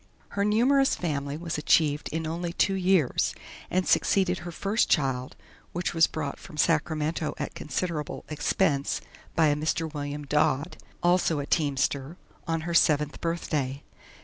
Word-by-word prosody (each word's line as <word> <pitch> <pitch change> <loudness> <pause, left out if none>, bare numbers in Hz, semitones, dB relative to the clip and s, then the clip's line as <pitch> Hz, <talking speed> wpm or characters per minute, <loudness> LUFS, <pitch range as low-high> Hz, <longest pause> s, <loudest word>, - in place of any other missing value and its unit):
Her 200 - -1
numerous 255 +6 +3
family 145 -4 -3
was 165 -2 -3
achieved 150 -1 +2
in 160 +1 -3
only 170 +2 -3
two 195 - +2
years, 185 -6 +2 0.3
and 185 0 0
succeeded 185 -2 +2
her 175 - -7
first 200 +6 0
child, 130 -4 0 0.4
which 175 +1 -2
was 165 -1 +5
brought 145 -3 -4
from 150 - -12
Sacramento 155 0 0
at 145 - -4
considerable 155 0 -3
expense 150 -1 0 0.4
by 160 -2 +4
a 145 - +2
Mr. 155 +1 -1
William 145 0 -4
Dodd, 150 +2 +1 0.3
also 175 -2 +3
a 145 - -2
teamster, 140 0 0 0.3
on 165 -1 0
her 170 +1 -4
seventh 150 -2 +3
birthday. 150 -5 -2
160 Hz, 145 wpm, -27 LUFS, 145-175 Hz, 0.4 s, was